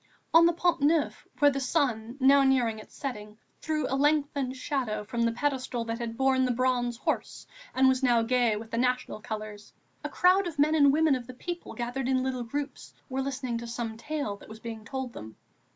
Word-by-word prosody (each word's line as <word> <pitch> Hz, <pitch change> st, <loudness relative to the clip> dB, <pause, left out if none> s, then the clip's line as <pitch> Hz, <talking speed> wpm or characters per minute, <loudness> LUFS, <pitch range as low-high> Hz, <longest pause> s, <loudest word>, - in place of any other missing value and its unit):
On 335 Hz, +1 st, +8 dB
the 340 Hz, -, +2 dB
Pont 345 Hz, -2 st, +1 dB
Neuf, 300 Hz, +1 st, +1 dB
where 290 Hz, -1 st, +5 dB
the 275 Hz, -, -2 dB
sun, 250 Hz, -4 st, -1 dB
now 275 Hz, +1 st, +6 dB
near 265 Hz, -3 st, +3 dB
its 220 Hz, -1 st, -7 dB
setting, 210 Hz, -6 st, -6 dB, 0.2 s
threw 310 Hz, -1 st, -1 dB
a -, -, -3 dB
lengthened 280 Hz, -2 st, +1 dB
shadow 250 Hz, -6 st, -2 dB
from 235 Hz, +3 st, -3 dB
the 230 Hz, 0 st, +3 dB
pedestal 255 Hz, -2 st, -2 dB
that 230 Hz, +1 st, -3 dB
had 230 Hz, -1 st, -5 dB
borne 265 Hz, -1 st, +3 dB
the 255 Hz, -, +1 dB
Bronze 245 Hz, -1 st, 0 dB
Horse -, -, -3 dB, 0.3 s
and 265 Hz, 0 st, +5 dB
was 260 Hz, 0 st, +3 dB
now 240 Hz, -3 st, +3 dB
gay 240 Hz, -2 st, +2 dB
with 220 Hz, +1 st, -8 dB
the 230 Hz, -, -1 dB
National 250 Hz, -3 st, -1 dB
colours, 215 Hz, -1 st, -7 dB, 0.3 s
a -, -, -3 dB
crowd 370 Hz, +1 st, +3 dB
of 325 Hz, -3 st, -6 dB
men 300 Hz, +2 st, +3 dB
and 285 Hz, -3 st, +6 dB
women 310 Hz, 0 st, +3 dB
of 250 Hz, -2 st, -3 dB
the 255 Hz, -, -9 dB
people 345 Hz, +6 st, -6 dB
gathered 245 Hz, +2 st, -3 dB
in 260 Hz, -1 st, +2 dB
little 260 Hz, -1 st, -2 dB
groups 285 Hz, +5 st, -5 dB
were 265 Hz, 0 st, -2 dB
listening 260 Hz, -3 st, -3 dB
to 235 Hz, -, -7 dB
some 230 Hz, -1 st, -4 dB
tale 235 Hz, -4 st, -4 dB
that -, -, -15 dB
was 220 Hz, 0 st, -10 dB
being 225 Hz, -1 st, -7 dB
told 265 Hz, -2 st, -5 dB
them. 110 Hz, 0 st, -9 dB
255 Hz, 210 wpm, -28 LUFS, 230-280 Hz, 0.3 s, On